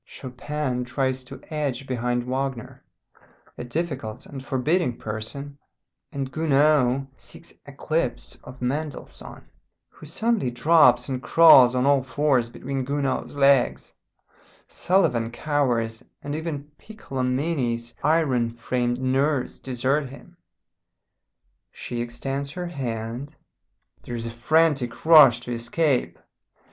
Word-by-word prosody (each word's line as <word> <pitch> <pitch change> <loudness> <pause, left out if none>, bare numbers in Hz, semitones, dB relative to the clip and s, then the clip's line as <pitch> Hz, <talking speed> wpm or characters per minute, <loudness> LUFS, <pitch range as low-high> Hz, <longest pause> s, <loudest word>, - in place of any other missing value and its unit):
Chopin 130 0 -4
tries 130 +1 -1
to 135 +1 -10
edge 140 -4 -2
behind 120 -1 -1
Wagner, 130 -1 -4 0.7
a - - -7
difficult 130 -4 -4
and 135 -2 -9
forbidding 135 +1 0
person, 140 +7 -6 0.5
and 135 -1 -4
Gounod 145 -4 +2
seeks 170 - -9
eclipse 140 -1 -3
of 125 0 -10
Mendelssohn, 145 +4 -5 0.4
who 155 - -14
suddenly 220 - 0
drops 125 -2 +4
and 130 -2 -3
crawls 135 -7 +7
on 125 +1 +1
all 140 -1 +4
fours 130 -2 +1
between 135 +2 -4
Gounod's 140 0 -2
legs; 140 -2 +3 0.7
Sullivan 125 -12 +1
cowers, 120 -4 -1 0.2
and 145 0 -4
even 155 -2 -5
Piccolomini's 130 - -2
iron 130 -7 +1
framed 120 +1 -1
nerves 135 +1 0
desert 130 +2 -1
him. 155 +6 -14 1.4
She 120 -1 -5
extends 135 +4 -4
her 180 +5 -5
hand. 125 -2 -5 0.7
There 120 - -6
is 115 -1 -5
a 115 - -4
frantic 140 +1 +1
rush 145 -8 +8
to 120 - -7
escape. 125 +4 0
135 Hz, 110 wpm, -24 LUFS, 120-150 Hz, 1.4 s, rush